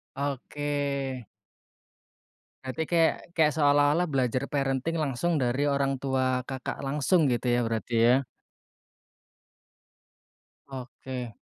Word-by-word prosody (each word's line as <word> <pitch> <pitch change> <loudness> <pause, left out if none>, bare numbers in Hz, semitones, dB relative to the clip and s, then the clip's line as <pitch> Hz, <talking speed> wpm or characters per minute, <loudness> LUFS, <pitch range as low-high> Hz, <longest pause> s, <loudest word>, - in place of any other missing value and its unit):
Oke. 140 -2 -3 1.4
Berarti 130 +5 -3
kayak 170 0 +1
kayak 155 -2 +4
seolah-olah 145 +4 +4
belajar 130 -2 0
parenting 135 +3 -1
langsung 155 +2 0
dari 130 +4 +1
orang 140 -1 +1
tua 130 -1 0
Kakak 130 -2 -5
langsung 150 +3 +2
gitu 125 -1 0
ya, 120 - +3
berarti 115 +1 -3
ya. 130 +3 +5 2.5
Oke. 130 -2 -7
135 Hz, 95 wpm, -27 LUFS, 130-145 Hz, 2.5 s, ya